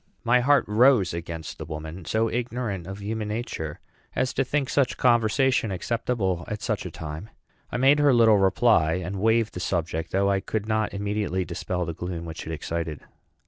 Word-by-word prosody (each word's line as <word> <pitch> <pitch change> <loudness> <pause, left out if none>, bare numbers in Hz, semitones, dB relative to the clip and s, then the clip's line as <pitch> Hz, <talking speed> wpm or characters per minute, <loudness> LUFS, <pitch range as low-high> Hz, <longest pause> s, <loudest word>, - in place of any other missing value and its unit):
My 125 +2 +4
heart 140 +3 +4
rose 110 -4 +4
against 85 -1 -6
the - - -5
woman, 80 +2 -7
so 110 +7 +1
ignorant 115 -6 -3
of 100 +1 -7
human 110 +1 -3
nature 105 -9 -4 0.4
as 130 0 0
to 135 - +1
think 140 +1 -1
such 135 -3 +1
conversation 120 0 +3
acceptable 95 -2 -1
at 105 -1 -5
such - - -2
a - - -6
time. 80 +7 -7 0.4
I - - -1
made 135 +3 +5
her 145 -1 +5
little 115 -4 +5
reply, 95 -4 +3
and 90 +2 -3
waved 115 0 +2
the - - -5
subject, 85 -3 -2
though 100 +1 +2
I 100 - +2
could 105 +1 -3
not 110 -1 0
immediately 100 -2 -1
dispel 90 +1 -3
the 85 - -4
gloom 85 0 -5
which 80 -1 -7
it - - -4
excited. 80 -1 -4
105 Hz, 185 wpm, -25 LUFS, 85-120 Hz, 0.4 s, made